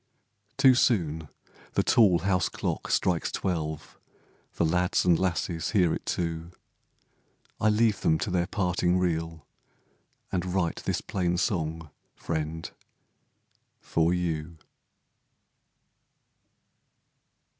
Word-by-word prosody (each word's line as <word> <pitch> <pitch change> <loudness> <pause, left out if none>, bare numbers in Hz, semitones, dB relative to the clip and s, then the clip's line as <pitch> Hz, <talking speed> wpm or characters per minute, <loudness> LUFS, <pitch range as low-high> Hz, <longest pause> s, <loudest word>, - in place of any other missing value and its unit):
Too 135 -2 +7
soon 80 - +1 0.4
the - - +2
tall 100 -7 +5
house 95 -2 +2
clock - - -3
strikes 90 -3 +1
twelve, 80 -4 -3 0.6
The 85 - +1
lads 90 +2 +1
and 85 -2 +4
lasses 85 -2 -1
hear 90 -6 +3
it - - -6
too, 85 -1 -2 1.1
I 110 - +3
leave 105 -1 +2
them 80 - +3
to 95 - -3
their 90 -1 +1
parting 90 -2 +1
reel, 80 -3 -2 0.9
And 90 -2 0
write 85 -3 0
this - - -1
plain 90 -2 -1
song, 80 -6 -2 0.2
friend, 80 0 -4 1.1
for 80 +1 +1
you. 85 -2 -2
85 Hz, 100 wpm, -27 LUFS, 80-95 Hz, 1.1 s, Too